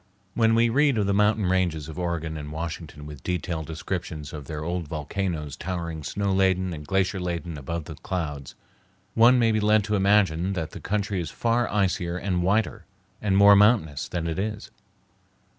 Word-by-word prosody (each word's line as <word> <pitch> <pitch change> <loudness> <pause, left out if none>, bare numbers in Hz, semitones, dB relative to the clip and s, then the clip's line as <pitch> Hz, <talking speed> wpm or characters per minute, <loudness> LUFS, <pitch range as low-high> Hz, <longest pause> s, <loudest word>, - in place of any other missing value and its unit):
When 115 -1 +3
we 115 +1 +4
read 140 +2 +3
of 105 - +2
the 100 - +1
mountain 105 +1 +3
ranges 90 -5 0
of 80 +2 -7
Oregon 85 -2 -2
and 75 -1 -6
Washington 80 -2 -6
with 75 -3 -9
detailed 90 -2 -3
descriptions 80 -2 -5
of 75 -3 -7
their 75 +1 -5
old 85 0 -3
volcanoes 80 -1 -3
towering 85 -3 -4
snow 100 +5 -1
laden 95 -1 +2
and 75 -2 -8
glacier 95 +1 +1
laden 85 -2 -3
above 75 +3 -5
the 80 - -7
clouds, 75 -3 -5 0.6
one 120 +3 +6
may 115 -2 +3
be 110 - +1
led 105 0 +3
to 105 0 -1
imagine 95 -3 +3
that 80 -3 -3
the - - -8
country 100 -2 -1
is 80 - -5
far 120 +5 0
icier 90 -3 0
and 90 -2 -1
whiter 100 +5 0 0.4
and 100 -2 +2
more 100 0 +8
mountainous 100 - +3
than 85 -2 -3
it 85 +2 -2
is. 105 +1 -4
90 Hz, 180 wpm, -25 LUFS, 80-100 Hz, 0.6 s, more